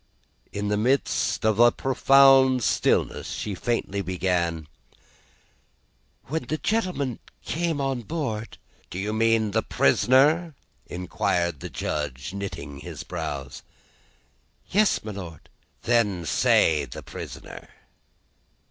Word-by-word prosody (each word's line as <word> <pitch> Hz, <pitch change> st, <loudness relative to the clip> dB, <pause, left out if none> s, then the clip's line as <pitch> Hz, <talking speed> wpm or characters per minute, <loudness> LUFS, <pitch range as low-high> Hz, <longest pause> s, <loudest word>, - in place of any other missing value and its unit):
In 100 Hz, 0 st, -3 dB
the 105 Hz, -, +1 dB
midst 130 Hz, -2 st, +1 dB
of 110 Hz, 0 st, +2 dB
a 120 Hz, 0 st, +7 dB
profound 135 Hz, -1 st, +5 dB
stillness, -, -, +1 dB
she 105 Hz, -, -4 dB
faintly 100 Hz, -1 st, -2 dB
began: 85 Hz, -3 st, -1 dB, 1.6 s
"When 160 Hz, +4 st, -3 dB
the 155 Hz, -, -2 dB
gentleman 180 Hz, -, -1 dB, 0.3 s
came 165 Hz, -2 st, -1 dB
on 135 Hz, -3 st, -1 dB
board 115 Hz, -5 st, -4 dB, 0.2 s
" -, -, -33 dB
"Do -, -, -7 dB
you 105 Hz, +3 st, -2 dB
mean 110 Hz, -1 st, +2 dB
the 110 Hz, +2 st, +1 dB
prisoner?" 145 Hz, +12 st, +3 dB, 0.3 s
inquired 85 Hz, -2 st, -1 dB
the -, -, -7 dB
Judge, 75 Hz, +1 st, -4 dB
knitting 80 Hz, -8 st, -6 dB
his -, -, -8 dB
brows. 70 Hz, -2 st, -5 dB, 1.1 s
"Yes, 210 Hz, +1 st, +3 dB
my 110 Hz, -, -5 dB
Lord." 90 Hz, -6 st, -9 dB, 0.4 s
"Then 105 Hz, -8 st, +1 dB
say 75 Hz, -1 st, +3 dB
the -, -, -9 dB
prisoner." -, -, -9 dB
110 Hz, 110 wpm, -25 LUFS, 90-135 Hz, 1.6 s, a